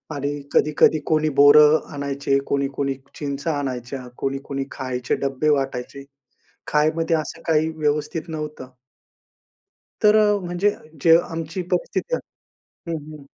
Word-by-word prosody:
आणि 145 +1 -3
कधी-कधी 155 +1 +4
कोणी 155 -1 +2
बोरं 150 +2 +7 0.2
आणायचे, 140 -1 -1
कोणी-कोणी 140 0 -1 0.2
चिंचा 145 +2 -3
आणायच्या, 130 -1 -5
कोणी-कोणी 135 0 -3
खायचे 125 -2 -2
डब्बे 140 +2 -1
वाटायचे. 135 -1 -1 0.6
खाण्यामध्ये 155 +2 +2
असं 160 +1 -4
काही 160 0 +3
व्यवस्थित 150 +2 -1
नव्हतं. 150 -4 -6 1.4
तर 210 0 +6
अ, 210 -1 +4
म्हणजे 175 +4 +1 0.3
जे 165 0 +7
आमची 165 +3 -4
परिस्थिती - - -1 0.5
आहे 170 - -10
हं, 160 - -2 0.2
हं. 140 - -14
150 Hz, 115 wpm, -22 LUFS, 140-160 Hz, 1.4 s, बोरं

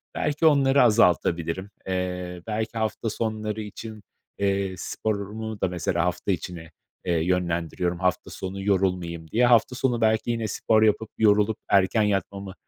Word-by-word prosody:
Belki 150 +2 0
onları 140 -3 +5
azaltabilirim, 95 -5 +2 0.2
eee, 90 -1 -3
belki 110 +1 -3
hafta 110 +1 -1
sonları 110 -1 -3
için, 110 0 -8 0.3
eee, 100 -1 0
sporumu 110 +2 -4
da, - - +2
mesela, 90 -1 -1
hafta 90 +2 -1
içine, 85 -2 -5 0.3
eee, 90 - +1
yönlendiriyorum 85 0 -1
hafta 90 0 0
sonu 95 +1 -6
yorulmayayım 90 -4 0
diye. 120 +3 +3
Hafta 120 +1 +4
sonu 125 -2 0
belki 110 +1 +2
yine 115 -2 -2
spor 110 0 +2
yapıp 110 0 +2
yorulup 105 0 +3
erken 100 +2 +3
yatmamı 100 -1 -2
100 Hz, 135 wpm, -25 LUFS, 90-110 Hz, 0.3 s, onları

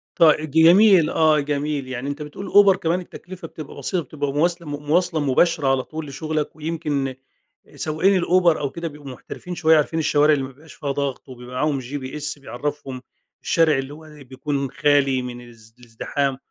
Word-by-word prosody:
طي 155 -2 +4
جميل، 170 +3 +6
آه، 155 -1 +3
جميل. 145 -1 -2
يعني 130 +2 -4
أنت 145 +2 -5
بتقول 150 +7 -7
أوبر 200 -1 +6
كمان 170 0 -1
التكلفة 180 -1 -10
بتبقى 155 -2 -10
بسيطة 170 +5 -2
بتبقى 145 0 -4
مواسل 170 +3 0
مُواصْلة 155 +4 0
مباشرة 145 +2 +2
على 135 -1 +2
طول 155 +1 -7
لشغلك، 155 +1 -3
ويمكن 150 -4 -3 0.6
سواقين 165 +6 +1
الأوبر 175 -2 +3
أو 140 - -2
كده 170 +4 -5
بيبقوا 145 -2 -10
محترفين 180 +7 -8
شوية، 160 -1 +4
عارفين 155 +2 0
الشوارع 150 -1 +3
اللي 140 -2 0
ما 130 - -6
بيبقاش 150 +4 -16
فيها 140 - -4
ضغط 140 -1 -3
وبيبقى 125 0 -10
معاهم 145 +1 0
GPS 145 +3 -5
بيعرفهم 135 0 -5 0.4
الشارع 160 -4 +3
اللي 135 +1 -4
هو 160 +1 -13
ي 150 -2 -14
بيكون 135 +1 -4
خالي 140 -2 +2
من 125 -1 -7
الز 115 -2 -17
الازدِحام، 130 +3 -3
150 Hz, 170 wpm, -22 LUFS, 135-160 Hz, 0.6 s, جميل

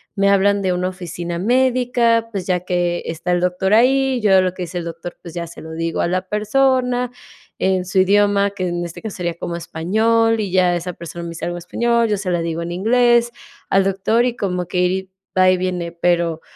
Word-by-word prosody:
me 200 -1 +3
hablan 200 0 +3
de 185 -1 +1
una 180 +1 -1
oficina 175 -2 -6
médica, 240 0 +2
pues, 195 -3 -4
ya 180 -1 +1
que 175 -1 -1
está 165 +2 -3
el 175 - +2
doctor 180 +3 +1
ahí, 265 +2 +3
yo 195 -4 +4
lo 185 - 0
que 180 - -4
dice 175 +1 -5
el 170 - -6
doctor, 170 +1 -7
pues, 170 -1 -10
ya 170 - -3
se 170 - -11
lo 160 0 -9
digo 165 0 -2
a - - +1
la 185 +1 -2
persona 250 +3 +1 0.5
en 185 -1 +1
su 190 +1 0
idioma, 200 +1 +3
que 185 -2 -4
en 175 0 -2
este 170 +5 -8
caso 220 - -5
sería 170 -2 -2
como 170 - -4
español, 220 +7 +1
y 205 -3 -2
ya 180 -1 +3
esa 175 +1 -4
persona 170 +1 -8
me 170 - -6
dice 165 - -6
algo 175 0 -3
español, 235 +6 +1
yo 210 - +1
se 190 -2 -3
la 175 -1 0
digo 165 0 -3
en 170 - -5
inglés 235 +5 +3 0.4
al 195 0 +4
doctor, 195 +5 +1
y 245 -1 -1
como 180 -4 -2
que 180 - -2
ir 185 +1 0 0.3
va 185 0 +6
y 185 - +2
viene. 180 -2 -3
Pero, 170 -1 0
185 Hz, 220 wpm, -19 LUFS, 175-220 Hz, 0.5 s, va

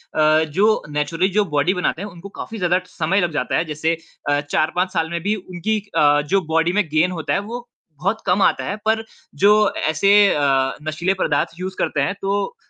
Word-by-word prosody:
अ, 155 0 +4
जो 195 +8 +2
नेचुरली 155 +5 0
जो 205 +1 +1
बॉडी 150 +3 +1
बनाते 180 -2 -1
हैं 205 - -5
उनको 175 +2 -11
काफ़ी 220 +2 -8
ज़्यादा 180 -1 +2
समय 180 +4 0
लग 175 -2 0
जाता - - -1
है। 165 - 0
जैसे 160 +1 -1 0.3
अ, 145 0 +2
4-5 175 +5 -1
साल 160 -3 0
में 170 -1 -3
भी 210 +3 +1
उनकी 190 +3 -3 0.2
अ, 145 0 +4
जो 190 +6 +1
बॉडी 165 +2 +2
में 210 +1 +3
गेन 155 +4 +2
होता 165 -3 -2
है - - +2
वो 235 +4 -7 0.3
बहुत 195 +6 -1
कम 185 +2 +2
आता - - +2
है 200 - -2
पर 220 0 +1 0.3
जो 210 +1 +4 0.2
ऐसे 195 +6 +3 0.2
अ, 135 -2 +2
नशीले 170 +5 0
पदार्थ - - +1
यूज़ 185 +1 -5
करते 140 - 0
हैं 140 +8 -1
तो 200 - -1
180 Hz, 205 wpm, -20 LUFS, 155-200 Hz, 0.3 s, अ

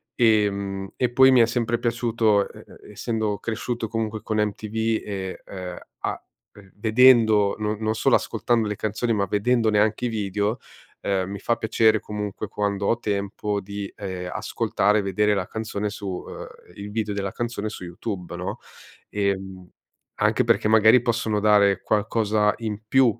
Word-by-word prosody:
ehm, 100 -4 +1
e 125 - +1
poi 130 +1 +6
mi 130 - +6
è 115 - +7
sempre 115 0 -1
piaciuto 115 -3 +1
e - - -14
e - - -15
essendo 110 -1 -2
cresciuto 115 +2 -3
comunque 110 -1 -3
con 110 0 -2
MTV 105 +1 -2 0.3
e 95 -2 -5
e 90 -2 -7 0.2
ah - - -3 0.5
vedendo 110 -2 +5
non 110 +1 -1
solo - - +3
ascoltando 115 -2 0
le 105 - -2
canzoni, 110 +3 -1
ma 100 -2 +1
vedendone 110 +2 +2
anche 110 +3 +1
i - - +2
video, 105 0 -1 0.4
uhm, 95 -1 -1
mi 100 0 -6
fa 115 +4 0
piacere 110 -1 +2
comunque 105 0 -5
quando 100 -1 -1
ho 115 - +2
tempo 100 -1 -2
di, 100 +1 -6
ehm, 95 -3 -5
ascoltare, 105 +2 +1
vedere 105 +2 +1
la 95 -3 -1
canzone 110 -2 -3
su 100 -1 -7
uhm, 90 -2 -6 0.3
il 100 0 -8
video 105 -1 -2
della 100 -1 -3
canzone 120 -3 -3
su 95 - -8
YouTube, 90 0 -6
no? 95 +5 -4 0.5
Ehm, 95 -2 -2 0.5
anche - - +2
perché - - +2
magari 110 +2 +6
possono 115 -3 0
dare 105 -2 +4
qualcosa 105 0 +1
in 110 -2 -4
più, 130 +4 +4
105 Hz, 155 wpm, -24 LUFS, 100-110 Hz, 0.5 s, è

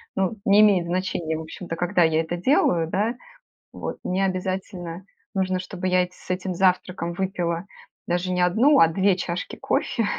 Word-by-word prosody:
Ну, 190 +2 +1
не 200 +1 +6
имеет 195 -5 +5
значения, 175 -3 -2
в 160 - -5
общем-то, 165 +1 -7
когда 175 +1 +2
я 160 0 +3
это 165 +2 -3
делаю, 175 - +2
да. 215 +7 0 0.6
Вот. - - -5
Мне 190 +2 0
обязательно 185 -1 -4 0.3
нужно, 185 -1 0
чтобы 185 0 -4
я 180 0 +4
эт 180 - -12
с 180 - -18
этим 185 0 -2
завтраком 180 -1 +1
выпила 175 -2 -2 0.4
даже 180 +1 -1
не 180 - 0
1, 235 +12 +4
а 165 - +7
2 190 +2 +2
чашки 175 0 -4
кофе. 230 - -1
180 Hz, 170 wpm, -24 LUFS, 170-190 Hz, 0.6 s, а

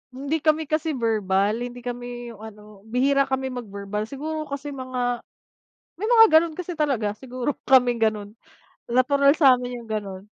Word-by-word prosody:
Hindi 280 +4 -2
kami 310 0 +3
kasi 310 +1 0
verbal, 205 -2 +1
hindi 245 0 -8
kami, 245 0 -5 0.3
yung 210 - -15
ano, 215 -1 -10 0.3
bihira 275 +2 +2
kami 265 0 -1
mag-verbal 210 -3 -5
siguro 310 +3 -4
kasi 280 +1 -5
mga 250 -2 -3 0.8
may 425 - -2
mga 455 -1 +8
ganun 330 -1 -4
kasi 360 +1 -5
talaga, 255 -9 +1
siguro 255 +1 -3 0.2
kaming 250 -3 +4
ganun, 215 -2 0 0.6
natural 280 +3 +3
sa 270 -5 +7
amin 245 0 -5
yung 230 - -14
ganon. 200 -3 -4
250 Hz, 155 wpm, -24 LUFS, 220-280 Hz, 0.8 s, mga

